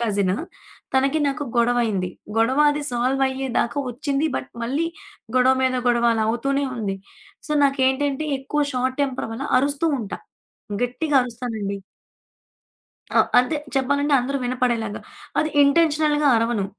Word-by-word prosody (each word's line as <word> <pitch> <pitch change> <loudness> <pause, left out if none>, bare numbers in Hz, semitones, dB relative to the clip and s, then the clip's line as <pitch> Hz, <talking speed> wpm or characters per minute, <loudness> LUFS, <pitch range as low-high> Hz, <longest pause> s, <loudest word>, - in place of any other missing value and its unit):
Cousin. 200 -5 +1 0.6
తనకీ, 275 +4 +2
నాకు 290 +1 -3
గొడవైంది. 235 -6 +1 0.3
గొడవ 230 +5 +2
అది 295 0 -2
సాల్వ్ 255 +3 0
అయ్యేదాకా 265 -1 -1
ఒచ్చింది 280 +4 -1
బట్, - - -5
మళ్ళీ 280 +8 -1 0.5
గొడవ 255 +1 +5
మీద 255 0 +2
గొడవ 235 0 +3
అలా 220 -1 +1
అవుతూనే 275 +5 0
ఉంది. 200 -4 -2 0.5
సో, - - -11
నాకేంటంటే 275 +2 +1
ఎక్కువ 295 +2 -1
షార్ట్ 255 +2 -1
టెంపర్ 265 -4 -2
వల్ల 245 +5 -5
అరుస్తూ 285 +4 0
ఉంటా. 210 -4 -5 0.7
గట్టిగా 280 +4 -1
అరుస్తానండి. 225 -5 -4 1.4
ఆ! - - +3 0.2
అంతే 250 +5 0 0.2
చెప్పాలంటే 280 +2 +1
అందరూ 275 +3 -2
వినపడేలాగా 240 -4 -1 0.4
అది 310 - +1
ఇంటెన్షనల్‌గా 300 0 +3
అరవను. 225 -3 0
260 Hz, 125 wpm, -22 LUFS, 235-280 Hz, 1.4 s, గొడవ